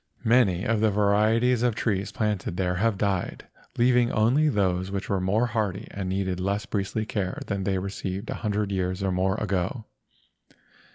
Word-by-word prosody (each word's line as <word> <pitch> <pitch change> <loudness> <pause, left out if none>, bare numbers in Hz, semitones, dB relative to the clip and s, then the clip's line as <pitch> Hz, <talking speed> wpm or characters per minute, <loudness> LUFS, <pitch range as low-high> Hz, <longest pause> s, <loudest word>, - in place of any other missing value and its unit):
Many 110 -7 +3
of 110 0 +1
the 110 0 +3
varieties 110 +4 +3
of 120 -3 +1
trees 100 -3 -1
planted 105 -5 -2
there 90 -1 0
have 110 +1 +1
died, 95 -3 -2 0.3
leaving 120 0 +3
only 130 +8 +3
those 95 -5 0
which 100 -1 -4
were 100 -2 0
more 105 +6 +2
hardy 110 -3 -2
and 95 -2 -4
needed 95 -1 -1
less 100 +3 -1
priestly 105 +2 -2
care 100 -4 -3
than 100 -2 -3
they 95 -1 +1
received 95 +1 -4
a - - -5
hundred 105 -2 -1
years 95 0 -1
or 95 - +1
more 95 +1 +1
ago. 100 +1 -2
100 Hz, 170 wpm, -26 LUFS, 95-110 Hz, 0.3 s, Many